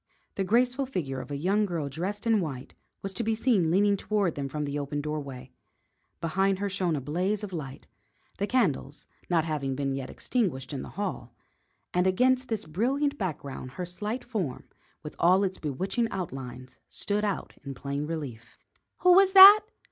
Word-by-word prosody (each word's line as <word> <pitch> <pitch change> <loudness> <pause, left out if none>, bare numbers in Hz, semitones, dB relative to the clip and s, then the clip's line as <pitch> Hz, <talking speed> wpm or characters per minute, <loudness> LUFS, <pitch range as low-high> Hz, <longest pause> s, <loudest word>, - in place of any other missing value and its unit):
The 195 - -1
graceful 250 +6 +2
figure 140 - -3
of 125 - -11
a 140 - -3
young 195 +8 +1
girl 165 -5 -3
dressed 185 - -4
in 225 -2 +3
white 140 -8 -5 0.3
was 195 0 -3
to 210 - -2
be 225 0 0
seen 215 -8 +2
leaning 200 +4 +3
toward 200 -3 0
them 140 -1 -4
from 150 +2 -3
the 145 +1 -3
open 145 +1 -3
doorway. 140 -4 -5 0.7
Behind 190 +4 +1
her 200 +1 -2
shone 180 -4 0
a - - -1
blaze 180 +10 -1
of 195 -3 -6
light 140 -4 -6 0.5
the 200 - 0
candles 165 - 0 0.2
not 165 -3 +2
having 140 -4 -2
been 135 0 -1
yet 135 -1 -4
extinguished 160 - -2
in 135 - -3
the - - -8
hall 150 - -4 0.6
and 180 +1 +2
against 255 +7 +2
this 225 -6 -3
brilliant 270 - 0
background 140 -8 -5
her 180 - -4
slight 210 +8 -4
form, 200 - -3 0.4
with 150 - -8
all 185 +3 +5
its 190 -1 -2
bewitching 190 - -1
outlines, 130 - -7
stood 210 +1 -1
out 205 -2 -2
in 140 -1 -6
plain 140 +3 -4
relief. 130 -8 -6 0.5
"Who 360 0 +7
was 385 +1 +6
that?" 395 +2 +12
180 Hz, 180 wpm, -28 LUFS, 140-210 Hz, 0.7 s, that